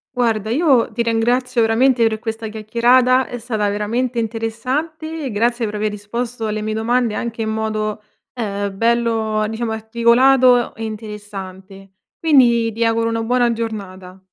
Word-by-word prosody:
Guarda, 225 -4 0
io 265 -2 +3
ti 235 - -1
ringrazio 240 +2 +1
veramente 230 +1 +3
per 220 -1 -2
questa 225 0 -5
chiacchierata, 240 +4 +2
è 245 - -6
stata 220 -3 -2
veramente 230 +5 -2
interessante. 260 +8 -3
Grazie 235 +3 0
per 210 0 -5
aver 210 0 -1
risposto 225 +3 -4
alle 215 0 -2
mie 215 0 -2
domande 230 +1 0
anche 230 0 -3
in 220 - -2
modo, 215 -1 -2 0.3
ehm, 200 -4 -3
bello 225 -1 +1
diciamo 225 +1 -3
articolato, 240 +3 +3
e 225 - -5
interessante. 195 -3 -9 0.3
Quindi, 240 -7 +4
ti 230 +2 -2
auguro 230 0 +1
una 225 0 -1
buona 240 +1 +2
giornata. 195 -5 -6
225 Hz, 140 wpm, -19 LUFS, 215-245 Hz, 0.3 s, Quindi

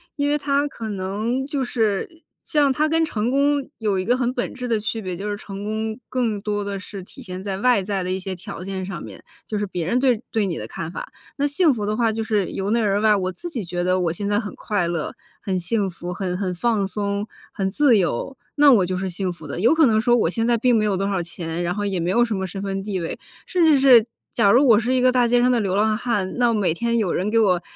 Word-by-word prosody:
因 285 -1 0
为 295 - +2
它 285 0 +1
可 225 -5 -7
能 210 +7 -2
就 280 -2 -2
是 235 - -1 0.2
像 290 -3 +3
它 305 +4 +1
跟 325 +1 +2
成 225 -6 -1
功 280 0 +2
有 205 -4 0
一 185 - -2
个 245 +2 +3
很 250 -1 0
本 245 - -3
质 250 -2 -5
的 225 -2 +1
区 220 +1 -2
别， 185 -2 -4
就 200 +3 -5
是 205 - -2
成 200 -1 -8
功 220 +2 -3
更 230 -5 -1
多 205 0 -2
地 200 -1 -4
是 195 0 -8
体 265 - -13
现 185 -4 -7
在 195 -2 -3
外 245 -2 +3
在 195 -2 -2
的 185 - -3
一 190 - -1
些 190 0 -4
条 185 0 -8
件 190 -1 -4
上 185 -2 -6
面， - - -11 0.2
就 215 - -2
是 205 - -1
别 180 -3 -3
人 245 +6 +2
对 250 -4 +2
对 220 -2 +1
你 175 -4 -2
的 - - -5
看 170 0 -6
法。 - - -7 0.3
那 285 - +1
幸 295 +1 +3
福 215 -4 -3
的 210 +1 -1
话 230 -2 +2
就 225 +1 -2
是 210 -3 0
由 195 +1 -3
内 235 - +2
而 205 -2 +1
外， 215 -1 +5
我 185 -1 -1
自 345 - -7
己 245 - -4
觉 175 0 -3
得 185 +1 +2
我 170 -2 0
现 200 +3 -3
在 205 0 +2
很 210 -3 -6
快 200 -5 -1
乐、 170 -3 -3 0.3
很 190 -2 -1
幸 195 +2 0
福、 175 0 -6
很 180 -1 -3
很 190 -2 -2
放 210 -1 +1
松、 200 +1 -2 0.2
很 190 -1 -2
自 250 +2 +4
由， 185 - -2 0.2
那 290 -1 +7
我 200 -7 +5
就 185 +1 -2
是 190 0 -2
幸 185 +1 -2
福 160 -3 -13
的。 145 - -5
有 235 +9 +4
可 320 - +5
能 220 -3 +3
说 240 0 +4
我 220 - +2
现 225 +5 0
在 235 -1 +3
并 245 +1 +3
没 215 - +2
有 205 -2 +1
多 195 +1 -1
少 190 -3 0
钱， 170 0 -4
然 175 +2 -1
后 205 - -2
也 195 -3 -1
没 170 +2 -1
有 240 +5 +4
什 225 - -3
么 190 -1 -2
身 195 +2 -6
份 195 0 -2
地 195 -2 -3
位， 165 - -4 0.3
甚 360 -2 +1
至 295 -3 +5
是 250 -5 +7 0.3
假 200 -4 +4
如 265 +4 +5
我 225 -4 +7
是 240 +3 0
一 255 - +3
个 255 0 +5
大 245 -1 +4
街 245 +1 +3
上 250 - +4
的 245 -2 +3
流 195 -1 -1
浪 215 +1 +2
汉， 210 -6 -1
那 240 -1 +3
每 200 -7 +1
天 235 +6 0
有 205 -6 0
人 190 +3 -1
给 225 +1 +3
我 180 -5 +3
210 Hz, 295 characters per minute, -22 LUFS, 190-240 Hz, 0.3 s, 那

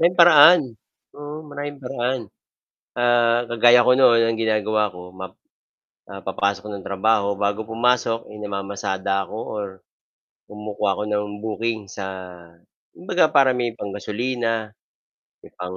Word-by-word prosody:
May 170 +2 +4
paraan, 170 0 +8 0.5
oo 145 +2 -8
maraming 145 0 -6
paraan. 125 0 -2 0.7
Ah, 120 0 +3
kagaya 120 +1 +5
ko 125 - +6
no'n, 120 -3 +5
ang 115 -1 -1
ginagawa 110 -2 0
ko, 90 0 -10
map 95 0 -9 0.8
ah, 100 0 -9
papasok 100 +1 -1
ng 100 -2 -8
trabaho, 100 0 +1
bago 105 +2 -2
pumasok, 115 0 0
eh, 105 - -10
namamasada 100 -1 -3
ako - - -8 0.2
or 105 -1 -3 0.8
kumukuha 105 -1 -3
ako 105 - -4
ng 105 0 -1 0.2
booking 110 +1 -2
sa 100 - -7 0.9
kumbaga 180 -1 0
para 135 -3 +5
may 120 -1 -1
panggasolina, 115 +2 -3 0.7
may - - -15
pang 90 +1 -6
110 Hz, 130 wpm, -22 LUFS, 100-125 Hz, 0.9 s, paraan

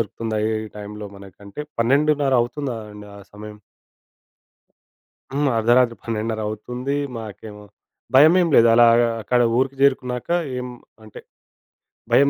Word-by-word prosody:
దొరుకుతుందా, 110 0 -4 0.3
ఈ 110 - -9
టైంలో 105 0 -8
మనకు 100 -2 -15
అంటే, 100 +8 -8 0.2
12.30 140 +3 +2
అవుతుంది 135 +2 -4 0.2
అండి 105 0 -12
ఆ - - -12 0.2
సమయం. 105 0 -10 1.7
హ్మ్. 140 0 0
అర్ధరాత్రి 120 +1 +3
12.30 110 -1 -3
అవుతుంది. 125 +6 -5 0.2
మాకేమో 105 -1 -10 0.5
భయమేమి 165 +5 +5
లేదు 115 - +6
అలాగా 120 0 +5
అక్కడ 120 +3 0 0.2
ఊరికి 135 +1 0
చేరుకున్నాక 125 -2 0 0.3
ఎం 125 - -7 0.3
అంటే, 110 -2 -12 0.9
భయం 140 +1 +5
115 Hz, 115 wpm, -21 LUFS, 105-135 Hz, 1.7 s, లేదు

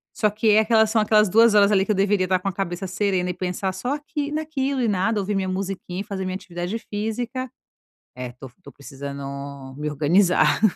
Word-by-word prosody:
Só 210 - +2
que 215 +1 +1
é 210 - +6
aquela 220 0 +4
são 220 0 +1
aquelas 210 0 +4
2 225 +2 +5
horas 205 0 +6
ali 190 -1 +4
que - - -9
eu 210 - +2
deveria 195 -1 +2
estar 185 0 +2
com 190 - -5
a 195 - -1
cabeça 190 0 -3
serena 185 -1 0
e - - -5
pensar 185 +1 -3
só 245 +10 -2
aqui 295 0 -4
naquilo 280 -4 -2
e 235 - +1
nada, 205 +2 +1
ouvir 205 +1 -2
minha 190 -1 0
musiquinha 190 -1 -4
e - - -4
fazer 195 -3 -5
minha 185 0 -3
atividade 175 +2 -4
física. 230 +4 -4 0.7
É, 125 -1 -6
tô 130 +2 -11
tô - - -12
precisando 140 -1 -8
me 150 +1 -3
organizar. 155 +4 +3
195 Hz, 210 wpm, -23 LUFS, 180-220 Hz, 0.7 s, é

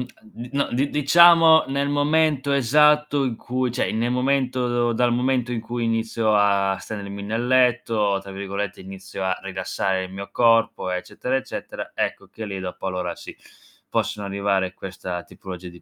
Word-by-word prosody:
a 220 - -27
n 125 - -10
no 140 0 +1
di 135 +4 0
diciamo 165 +2 +6
nel 140 +1 -1
momento 145 -1 +1
esatto 150 +2 +3
in 125 -4 -1
cui 125 +1 -2
cioè 125 - -1
nel 115 +2 -1
momento 125 -2 0
dal 120 +1 +2
momento 125 0 0
in 115 -2 -2
cui 120 +1 -4
inizio 115 -1 0
a 100 -1 +3
stendermi 100 0 -7
nel 115 +4 -2
letto, 115 -5 +2
tra 100 0 -10
virgolette, 100 +1 -5
inizio 95 0 -8
a 95 -1 0
"rilassare 95 0 -2
il 95 - -11
mio 100 +1 -7
corpo", 115 -3 +2
eccetera, 90 +7 -3
eccetera, 135 - -5
ecco - - -3
che 110 - -8
lì 100 -2 -5
dopo 95 +1 -5
allora 90 -2 -3
sì, - - -11 0.5
possono 105 -1 -2
arrivare 100 -1 -1
questa 90 -2 -6
tipologia 90 -1 -9
di 85 0 -15
115 Hz, 165 wpm, -23 LUFS, 95-130 Hz, 0.5 s, diciamo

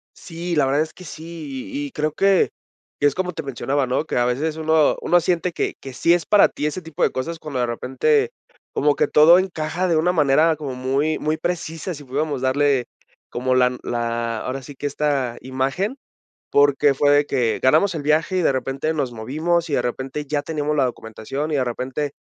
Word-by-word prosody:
Sí, 170 0 -5
la 150 - +3
verdad 140 +3 +2
es 155 - -10
que 185 - -13
sí, 170 - -8
y 290 +1 -2
y - - -12
creo 155 -7 -1
que 195 +2 +3 0.5
que 145 - +4
es 140 - 0
como 180 -1 -2
te 160 - -4
mencionaba, 135 +1 -1
¿no?, 130 +5 0
que - - -4
a 120 - +3
veces 145 +6 -1
uno 160 -1 +3
uno 175 - +4
siente 175 0 0
que - - -2
que 135 - -8
sí 170 +6 +3
es 175 -1 0
para 210 - +6
ti 150 - -3
ese 165 +4 -4
tipo 160 -3 -8
de - - +4
cosas 160 +6 -4
cuando, 140 -5 -5
de 125 - +2
repente, 135 - +1 0.4
como 145 0 +2
que - - +2
todo 165 +4 +7
encaja 180 -1 -2
de 165 - +2
una 175 +3 +2
manera 155 0 +3
como 145 -4 -6
muy 135 +5 0
muy 155 +1 -1
precisa, 170 0 -3
si 145 - -11
pudiéramos 140 +1 -2
darle 135 -1 +2 0.5
como 130 +1 0
la 125 0 +3
la, 115 -1 -2
ahora 130 +1 -4
sí 140 +2 -11
que 145 - -7
esta 140 -4 -1
imagen, 135 - -2 0.5
porque 145 0 +4
fue 145 +2 +3
de 145 0 +4
que 125 -6 0
ganamos 160 +8 +4
el 155 - -3
viaje 155 +5 +1
y, - - +1
de - - +3
repente, 135 +4 -2
nos 135 -5 -2
movimos, 155 +9 -1
y, 145 - -1
de - - +1
repente, 130 +4 -4
ya 145 +1 0
teníamos 150 -1 -2
la 140 - +3
documentación, 120 +6 -5
y 150 - +1
de 130 - +1
repente, 130 +4 -3
145 Hz, 215 wpm, -22 LUFS, 130-165 Hz, 0.5 s, todo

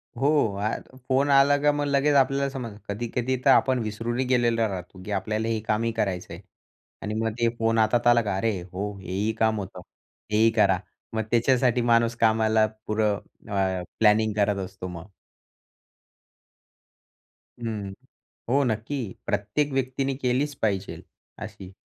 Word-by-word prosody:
हो. 135 +4 0 0.3
अ 110 +4 -4
फोन 135 +2 +2
आला 140 +1 +5
का 150 0 +4
मग 145 0 -1
लगेच 145 +1 +2
आपल्याला 140 0 +3
समजतं. 120 -6 -6
कधी-कधी 120 +4 -2
तर - - +6
आपण 130 -1 +4
विसरूनही 115 +4 -2
गेलेलो 120 -3 +2
राहतो, 95 -1 -7
की 105 - -7
आपल्याला 110 +3 -1
हे 115 -1 0
कामही 115 +2 +1
करायचं 95 -5 -2
आहे. - - -9 0.6
आणि 105 - -4
मग 110 +1 -1
ते 115 0 +3
फोन 115 0 +2
हातात 110 +2 +2
आला 120 0 +6
का, 100 -4 -2
"अरे 105 -1 0
हो, 95 +3 -5
हे 90 - -8
ही 100 +4 0
काम 110 -1 +2
होतं. 95 -2 -7 0.5
ते 105 - +1
ही 115 - +6
करा" 100 -5 +3 0.3
मग 110 - 0
त्याच्यासाठी 125 +1 +3
माणूस 115 0 +3
कामाला 110 -1 +4 0.2
पुरं 105 -1 +1 0.3
अ, 95 -2 0 0.2
प्लॅनिंग 110 0 +4
करत 100 -1 +1
असतो 95 0 -8
मग. 90 0 -8 2.6
हं. 105 -4 -4 0.6
हो 135 +4 +3
नक्की. 120 +4 -2 0.3
प्रत्येक 105 +8 -1
व्यक्तीने 135 +1 -1
केलीच 130 +4 0
पाहिजे 100 -3 -1 0.4
अशी. 95 0 -10
110 Hz, 150 wpm, -25 LUFS, 105-125 Hz, 2.6 s, तर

